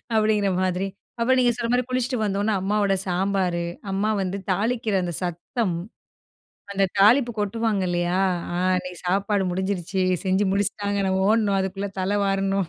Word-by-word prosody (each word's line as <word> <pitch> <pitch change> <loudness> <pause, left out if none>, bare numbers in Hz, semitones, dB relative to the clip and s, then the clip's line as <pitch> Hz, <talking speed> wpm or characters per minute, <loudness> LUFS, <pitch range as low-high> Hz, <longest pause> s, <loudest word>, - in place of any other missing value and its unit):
அப்படிங்கிற 215 -2 +2
மாதிரி. 185 +1 0 0.3
அப்போ 235 +3 +2
நீங்க 245 -1 +4
சொல்ற 230 - -2
மாதிரி 250 0 +2
குளித்துவிட்டு 255 -1 -1
வந்தோன 205 +2 0
அம்மாவோட 200 0 +1
சாம்பாரு 180 -1 0 0.3
அம்மா 200 +3 0
வந்து 190 +1 -2
தாளிக்கிற 220 +2 0
அந்த 175 -1 -3
சத்தம். 175 +3 -2 1.0
அந்த 195 0 +2
தாலிப்பு 235 +4 +5
கொட்டுவாங்க 210 -1 0
இல்லையா? 175 +1 0 0.3
ஆ - - -1 0.2
அன்னைக்கு 180 -1 -5
சாப்பாடு 200 +1 +1
முடிஞ்சிருச்சு, 190 0 -1 0.2
செஞ்சு 190 +2 +2
முடிச்சிட்டாங்க 205 0 -1
நம்ம 190 0 +1
ஓடணும், 210 -3 +2
அதுக்குள்ள 195 +1 -3
தல 200 +2 0
வாரணும். 195 -2 0
195 Hz, 140 wpm, -24 LUFS, 190-215 Hz, 1.0 s, தாலிப்பு